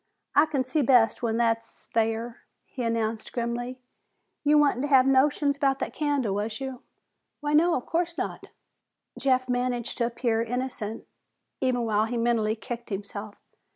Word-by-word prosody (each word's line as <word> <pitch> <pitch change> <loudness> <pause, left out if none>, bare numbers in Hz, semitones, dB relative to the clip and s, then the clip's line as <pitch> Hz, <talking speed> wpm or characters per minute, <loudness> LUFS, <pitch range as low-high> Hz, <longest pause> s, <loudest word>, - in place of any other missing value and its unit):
"I 295 +2 +5
can 275 -4 -1
see 295 +4 0
best 245 -3 +4
when 230 -2 0
hit's 230 -1 -1
thar," 225 +1 0 0.3
he 260 - -7
announced 230 -1 -1
grimly. 240 +1 -3 0.7
"You 300 0 +5
wa'nt 285 -3 +3
havin' 270 -2 +5
notions 280 +1 +3
'bout 275 -1 +2
that - - -4
candle, 285 -9 0
was 215 +2 -3
you?" 265 -2 -5 0.6
"Why, 295 -1 -2
no, 335 +3 +5
of 250 - -3
course 335 0 -1
not." - - -4 0.7
Jeff 255 -2 +2
managed 245 -1 -1
to 235 - +2
appear 235 -1 0
innocent, 230 -2 -3 0.5
even 250 -2 +1
while 215 -1 +2
he 235 +2 -3
mentally 230 -2 +1
kicked 235 +1 -7
himself. 205 +1 -6
245 Hz, 155 wpm, -27 LUFS, 225-270 Hz, 0.7 s, I